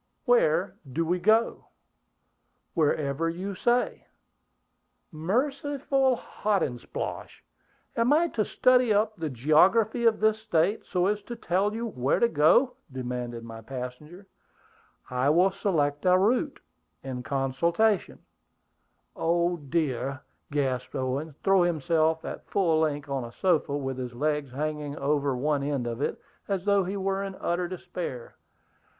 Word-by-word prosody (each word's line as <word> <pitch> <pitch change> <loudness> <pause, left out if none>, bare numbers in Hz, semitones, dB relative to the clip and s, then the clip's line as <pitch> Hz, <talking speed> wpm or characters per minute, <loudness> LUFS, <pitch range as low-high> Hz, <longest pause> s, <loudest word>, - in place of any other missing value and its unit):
"Where - - +3 0.2
do 165 +6 0
we 180 +2 0
go?" 220 +5 +2 1.1
"Wherever 155 -1 +1
you 185 +4 -4
say." 240 +6 0 1.0
"Merciful 270 - 0
Hotandsplosh! 195 - -3 0.5
Am 230 +3 +2
I 325 +3 +4
to 220 - 0
study 250 +1 +3
up 215 +1 +2
the 160 -5 -3
geography 185 - +3
of 225 -1 +4
this 220 0 +2
State, 200 -1 0
so 180 0 +1
as 210 +1 0
to 240 - -5
tell 200 0 0
you 230 +1 -3
where 135 - 0
to 235 - +4
go?" 235 - +3
demanded 125 -2 -4
my 115 -1 -9
passenger. 135 - -8 0.9
"I 125 +2 +1
will 180 +5 +4
select 145 -8 0
a 180 0 +6
route, 245 - +1 0.4
in 130 -2 -5
consultation 160 - 0 0.6
" - - -46
"Oh 170 +1 +1
dear!" 140 -3 -2 0.3
gasped 130 -4 -1
Owen, 135 +3 -2
throwing 195 -3 +4
himself 160 0 +1
at - - -7
full 170 -5 +2
length 150 -2 -1
on 135 -2 -2
a 120 - -8
sofa, 155 -6 +1
with 135 -2 -4
his 125 -1 -5
legs 150 +1 -1
hanging 150 +1 -3
over 140 -2 0
one 145 +2 0
end 140 -3 -1
of 120 +2 -4
it, - - -1 0.3
as 195 -2 -2
though 200 -1 +3
he 195 +3 -3
were 195 0 -1
in 195 -1 -5
utter 175 0 -1
despair. 170 -8 -6
165 Hz, 135 wpm, -27 LUFS, 140-205 Hz, 1.1 s, a